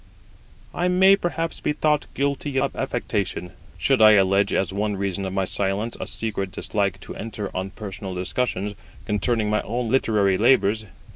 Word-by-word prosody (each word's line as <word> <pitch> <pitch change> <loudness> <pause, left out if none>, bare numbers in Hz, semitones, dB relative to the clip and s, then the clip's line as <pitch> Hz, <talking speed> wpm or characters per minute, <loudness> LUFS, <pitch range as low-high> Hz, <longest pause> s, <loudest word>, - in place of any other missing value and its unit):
I 175 - 0
may 190 +2 +6
perhaps 165 -3 -3
be - - -1
thought 150 -1 +1
guilty 140 0 -1
of 135 0 -1
affectation, 95 -6 -2 0.3
should - - +2
I 110 0 +9
allege 100 0 +3
as 95 -1 0
one 105 +1 -1
reason 100 0 -2
of 95 - -4
my 95 -1 0
silence 100 +5 0
a - - -4
secret 100 -4 -3
dislike 100 -1 -1
to - - -8
enter 105 -2 -6
on 95 +1 -2
personal 95 -2 -7
discussions 100 +1 -1 0.3
concerning 105 +1 0
my 105 - +2
own 120 +1 -3
literary 105 -7 +2
labours. 110 -3 +3
105 Hz, 160 wpm, -23 LUFS, 95-125 Hz, 0.3 s, I